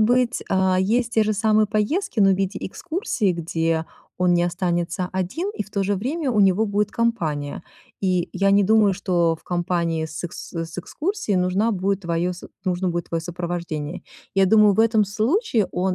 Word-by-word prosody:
быть, 245 +2 +2
а, 190 -1 +2
есть 235 +5 +1
те 220 - +4
же 215 0 +1
самые 215 +1 +3
поездки, 215 - -1
но 195 -1 +6
в - - +4
виде 195 0 -2
экскурсии, 255 - -1
где 165 -1 -1 0.3
он 180 -1 +3
не 175 - +3
останется 175 0 -1
один 190 - -2
и - - -2
в 205 - -18
то 200 -1 -1
же 205 +1 +1
время 270 - -2
у 215 - +2
него 195 +3 +4
будет 205 0 0
компания. 165 -11 -1 0.4
И 185 -3 +1
я 195 +1 +2
не 200 0 +5
думаю, 210 -1 +4
что 175 -4 +1
в - - -26
компании 170 -2 -1
с 160 +2 -7
эск 175 - -5
с 165 0 -6
экскурсией 310 - -2
нужна 185 +5 +1
будет 195 0 0
твоё 170 0 -1 0.3
нужно 185 0 0
будет 175 0 -2
твоё 165 -1 -1
сопровождение. 170 -3 -4 0.3
Я 195 -1 +4
думаю, 210 0 +6
в 220 - +3
этом 225 -2 +4
случае 225 - +1
он 185 +1 0
190 Hz, 185 wpm, -23 LUFS, 175-215 Hz, 0.4 s, но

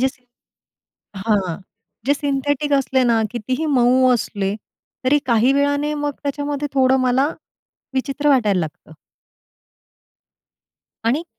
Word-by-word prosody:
जे 260 - +3 1.1
हां 195 -4 0 0.5
जे 285 - +4
सिं 285 0 -2
सिंथेटिक 285 +1 -1
असले 265 -1 +2
ना 230 -2 +3
कितीही 255 +6 -3
मऊ 255 -2 +4
असले 200 -4 -2 0.5
तरी 290 +3 +4
काही 240 +1 +3
वेळाने 285 +1 +1
मग 290 -1 -2
त्याच्यामध्ये 290 0 -3
थोडं 265 0 +4
मला 255 +2 +2 0.7
विचित्र 275 +2 -1
वाटायला 210 -9 +3
लागतं. 155 0 -7 2.2
आणि 295 +8 0
265 Hz, 110 wpm, -20 LUFS, 235-285 Hz, 2.2 s, जे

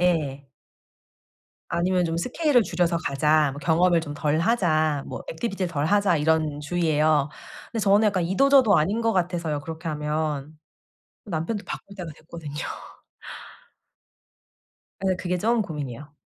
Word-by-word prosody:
예. 150 -6 0 1.2
아니면 180 +1 +1
좀 165 -1 -1
'스케일을 250 - +2
줄여서 170 -1 0
가자.' 150 -1 +2
뭐 145 - -8
'경험을 170 +2 +3
좀 155 -3 -6
덜 145 +1 0
하자.' 155 -8 +1
뭐 - - -6
'액티비티를 190 +1 -3
덜 145 -2 -1
하자.' 200 -1 +3
이런 155 -1 +1
주의예요. 155 -2 +2 0.4
근데 230 - -4
저는 205 +2 +4
약간 185 -4 0
이도 190 +11 +2
저도 260 -8 +6
아닌 195 +9 +1
것 225 0 +1
같아서요, 170 -5 -1
그렇게 160 +3 -6
하면. 150 -1 -3 0.7
남편도 195 +3 -3
바꿀 200 - -8
때가 180 -4 -6
됐거든요. 155 -2 -9 2.5
예. 185 - +1
그게 180 0 -2
좀 230 +4 +2
고민이에요. 145 - -7
165 Hz, 290 characters per minute, -25 LUFS, 150-190 Hz, 2.5 s, 저도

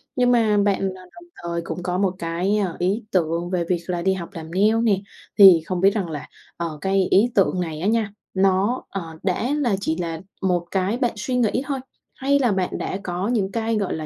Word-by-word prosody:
Nhưng 250 -1 +3
mà 220 -3 +3
bạn, 200 -1 +2
à, 185 - -12
đồng 345 - -13 0.2
thời 170 0 -2
cũng 175 +1 -5
có 180 0 -1
một 190 -1 +1
cái, 175 +5 0
ơ, 190 -5 -1
ý 195 +6 0
tưởng 170 -1 0
về 180 -2 0
việc 175 -2 +1
là 175 -1 -2
đi 190 +2 +2
học 180 -2 -6
làm 160 -1 -8
nail 210 +4 +3
nè, 210 -4 +3 0.4
thì 185 -5 +9
không 185 -1 -2
biết 195 - +6
rằng 190 -6 -2
là, 150 -3 -6 0.3
ờ, 165 -3 -4
cái 190 -1 +1
ý 230 +5 +4
tưởng 185 -2 +3
này 160 -2 -4
á 195 - 0
nha, 220 -2 +1 0.2
nó, 195 +5 +2
ờ, 195 - -4 0.2
đã 200 +6 0
là 240 -8 +1
chỉ 160 -3 0
là 165 -2 -4 0.2
một 180 -3 +1
cái 195 +4 0
bạn 245 -2 +1
suy 250 +4 -3
nghĩ 245 +1 +1
thôi? 275 -2 -2 0.4
Hay 280 +1 +2
là 245 -5 +2
bạn 190 -2 -1
đã - - -3
có 180 +3 -2
những 205 -5 0
cái, 230 0 -1
gọi 200 -3 -1
là, 155 -1 -5
190 Hz, 230 wpm, -22 LUFS, 175-215 Hz, 0.4 s, thì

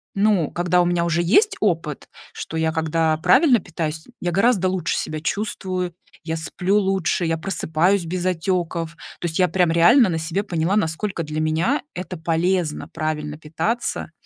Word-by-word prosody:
ну, 200 -5 +2
когда 175 0 +2
у - - +2
меня 175 -1 +1
уже 170 0 +1
есть 405 - +3
опыт, 165 -7 -1 0.2
что 160 - -6
я 160 0 +1
когда 160 0 +1
правильно 235 - +5
питаюсь, 160 -2 -5
м, 250 - -19
я 175 - -1
гораздо 195 0 +3
лучше 185 -4 -1
себя 155 -1 -3
чувствую, 185 -2 -3 0.3
я 160 0 -3
сплю 180 +5 0
лучше, 190 -3 0
я 165 0 0
просыпаюсь 175 +2 0
без 180 +2 -3
отеков. 170 -2 -1 0.3
То 175 - -1
есть 160 - -3
я 180 - +5
прям 180 -1 +2
реально 195 +7 +6
на 165 - -1
себе 160 +5 -2
поняла, 175 -1 0
насколько 190 0 -1
для 155 0 -4
меня 165 - +1
это 180 0 -5
полезно 165 0 0
правильно 150 -2 -3
питаться. 165 +10 -3
175 Hz, 170 wpm, -22 LUFS, 160-190 Hz, 0.3 s, реально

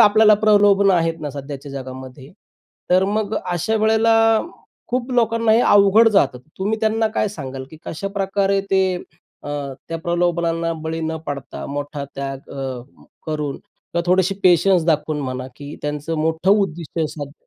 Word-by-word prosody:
आपल्याला 215 0 +7
प्रलोभन 205 -2 +4
आहेत 165 -3 +1
ना, 150 - -4
सध्याच्या 140 0 -8
जगामध्ये 130 0 -8 0.6
तर 185 +1 +4
मग 210 +1 -1
अशा 180 +5 0
वेळेला, 220 +1 +3 0.8
खूप 250 +1 -2
लोकांना 230 -1 +2
हे 230 - +5
अवघड 205 +2 +6
जातं. 145 - +2 0.2
तुम्ही 210 +3 -1
त्यांना 220 0 +1
काय 215 - +1
सांगाल? 135 -8 -7
की 160 - -11
कशाप्रकारे 195 +2 -1
ते 190 0 +4 0.6
अ, - - -8 0.4
त्या 165 - -3
प्रलोभनांना 170 -1 0
बळी 160 +1 -3
न 160 0 -2
पडता, 140 -2 -6
मोठा 145 0 -5
त्याग 135 0 -6
अ, 135 -2 -5 0.5
करून 150 -3 -3 0.4
का 170 - +2
थोडीशी 185 +2 +2
पेशन्स 180 -1 +4
दाखवून 155 -1 +1
म्हणा, 130 -1 -4
की 145 +1 -8
त्यांचं 150 +2 -3
मोठं 160 +4 +1
उद्दिष्ट 175 -6 0
साध्य 145 -2 -7
170 Hz, 145 wpm, -20 LUFS, 145-205 Hz, 0.8 s, आपल्याला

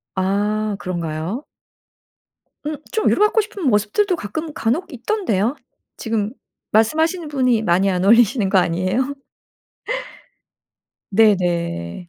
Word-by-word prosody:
아 205 +2 0
그런가요? 175 - -4 1.2
음 305 - -2 0.2
좀 440 - 0
위로 - - +1
받고 440 +1 +3
싶은 420 -2 -8
모습들도 245 - +2
가끔 310 +6 -5
간혹 330 +12 -1
있던데요. 250 - -1 0.4
지금 225 -3 -2 0.4
말씀하시는 315 - +2
분이 255 -6 +2
많이 190 0 +3
안 180 -1 0
올리시는 225 -1 +4
거 195 - +3
아니에요? 185 +10 +1 2.0
네네. 175 - +1
215 Hz, 240 characters per minute, -20 LUFS, 190-295 Hz, 2.0 s, 올리시는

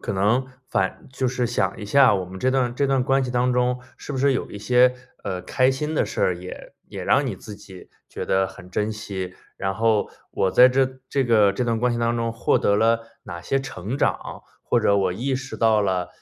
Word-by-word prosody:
可 - - -4
能， 105 +7 +2 0.2
反 95 - -1
就 130 -1 -1
是 125 -1 -1
想 120 - -1
一 - - -6
下 135 +3 +5
我 95 -2 -1
们 95 +1 -10
这 130 - +2
段 125 -2 0
这 140 +2 +1
段 135 -2 +2
关 135 0 +2
系 125 - -4
当 125 +1 +1
中， 125 0 +1 0.2
是 - - -10
不 130 - -3
是 140 +1 +3
有 - - -3
一 100 - -7
些， 125 +3 +4 0.3
呃， 95 -2 -3
开 130 +1 +2
心 150 +4 -3
的 - - +2
事 - - -5
儿， 90 - +2
也 90 +1 -10
也 - - -7
让 140 - +3
你 105 -7 -3
自 105 +2 -10
己 95 -2 -13 0.2
觉 - - -6
得 95 0 +2
很 95 -1 -12
珍 105 +3 -1
惜？ 95 -4 -6 0.2
然 95 0 -2
后， 110 -1 +1 0.2
我 95 - +1
在 125 +5 +7
这 130 0 0
这 135 -2 0
个 105 -4 +4
这 125 - -2
段 115 -1 0
关 125 0 +1
系 120 - -2
当 115 0 +1
中 115 -1 -1
获 115 - +1
得 100 - +2
了 115 +1 +3 0.2
哪 85 0 -7
些 135 +10 -1
成 120 -1 -5
长？ - - -2 0.2
或 - - +2
者 100 - +3
我 95 -2 +1
意 130 +6 -2
识 130 0 -7
到 110 -2 +3
了， 95 -2 -1
115 Hz, 250 characters per minute, -23 LUFS, 100-130 Hz, 0.3 s, 在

